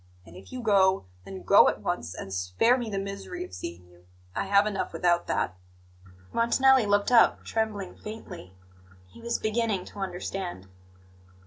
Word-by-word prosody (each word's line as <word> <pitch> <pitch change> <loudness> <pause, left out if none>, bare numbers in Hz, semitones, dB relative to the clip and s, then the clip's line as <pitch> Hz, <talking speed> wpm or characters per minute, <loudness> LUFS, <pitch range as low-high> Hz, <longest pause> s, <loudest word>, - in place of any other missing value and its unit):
And 85 - -15
if 95 +1 -13
you 255 -1 -6
go, 190 - +3 0.2
then 95 -2 -8
go 90 - +7
at - - -4
once, 85 +3 -3
and 95 - -7
spare 90 - +2
me 240 -3 -4
the 200 - -3
misery 200 - -5
of - - -15
seeing 85 +1 -7
you. 90 0 -22 0.3
I - - -1
have 200 +1 +4
enough 205 -2 -3
without 175 -1 +1
that." 95 - -1 0.8
Montanelli 255 +1 +4
looked 205 +2 +2
up, 235 -2 +5
trembling 215 -4 -2
faintly. 210 - -10 0.5
He 90 - -16
was 235 0 -1
beginning 215 -3 -1
to 205 - -11
understand. 180 - -5
200 Hz, 160 wpm, -27 LUFS, -, 0.8 s, go